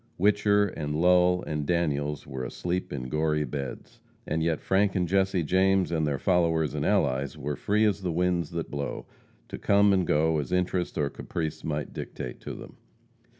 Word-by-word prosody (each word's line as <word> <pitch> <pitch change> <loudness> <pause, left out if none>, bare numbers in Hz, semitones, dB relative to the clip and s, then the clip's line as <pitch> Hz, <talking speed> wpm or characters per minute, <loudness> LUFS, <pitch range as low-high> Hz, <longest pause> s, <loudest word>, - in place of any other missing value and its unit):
Whicher 105 0 +3
and 75 0 -3
Lull 90 +1 +4
and 75 -1 -2
Daniels 75 -3 -1
were 65 -1 -5
asleep 90 +9 -3
in 65 -3 -4
gory 75 +2 0
beds. 70 0 -6 0.3
And 80 +1 -1
yet 80 -1 0
Frank 95 0 +1
and 90 -2 +1
Jesse 95 -1 +1
James, 95 +2 +2
and 80 -2 +1
their 70 -2 0
followers 80 -2 +1
and - - -2
allies, 65 +3 +1
were 75 0 -3
free 105 +2 +1
as 105 -1 +1
the 90 -2 -2
winds 85 -1 0
that 85 -2 -5
blow, 70 -1 -4 0.4
to - - -7
come 100 0 +4
and 95 -3 +1
go 80 +1 +2
as 75 - -4
interest 90 0 0
or 75 -2 0
caprice 80 -2 -4
might 75 -1 -3
dictate - - -6
to - - -7
them. - - -11
85 Hz, 180 wpm, -27 LUFS, 75-90 Hz, 0.4 s, Lull